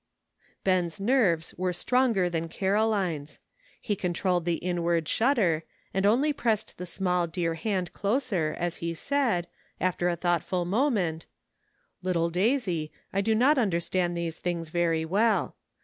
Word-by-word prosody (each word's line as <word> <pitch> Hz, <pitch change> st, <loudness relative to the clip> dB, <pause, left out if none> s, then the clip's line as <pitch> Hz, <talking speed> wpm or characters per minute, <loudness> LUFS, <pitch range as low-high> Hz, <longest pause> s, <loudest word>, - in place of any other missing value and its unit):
Ben's 180 Hz, -3 st, +1 dB
nerves 200 Hz, -8 st, +2 dB
were 185 Hz, 0 st, +1 dB
stronger 230 Hz, -1 st, +2 dB
than 165 Hz, -1 st, -2 dB
Caroline's. 190 Hz, -6 st, 0 dB, 0.4 s
He 210 Hz, -, -1 dB
controlled 180 Hz, -1 st, 0 dB
the 170 Hz, -1 st, +1 dB
inward 170 Hz, -2 st, 0 dB
shudder, 205 Hz, -, +2 dB, 0.3 s
and 195 Hz, +1 st, +2 dB
only 270 Hz, +8 st, +3 dB
pressed 220 Hz, -9 st, -1 dB
the 180 Hz, -, -5 dB
small 180 Hz, -1 st, 0 dB
dear 165 Hz, 0 st, -1 dB
hand 185 Hz, +1 st, -2 dB
closer, 200 Hz, -, 0 dB
as 175 Hz, -1 st, -2 dB
he 170 Hz, 0 st, -3 dB
said, 240 Hz, -, 0 dB, 0.3 s
after 180 Hz, -1 st, +1 dB
a 175 Hz, -, 0 dB
thoughtful 175 Hz, +1 st, 0 dB
moment, 190 Hz, -, 0 dB, 0.7 s
"Little 170 Hz, -2 st, 0 dB
Daisy, 185 Hz, -, 0 dB, 0.2 s
I 195 Hz, -, +2 dB
do 220 Hz, +2 st, +2 dB
not 265 Hz, +5 st, +4 dB
understand 175 Hz, -3 st, 0 dB
those 170 Hz, -1 st, -3 dB
things 170 Hz, -2 st, -3 dB
very 165 Hz, -1 st, +1 dB
well. 210 Hz, +7 st, +1 dB
180 Hz, 135 wpm, -27 LUFS, 170-215 Hz, 0.7 s, not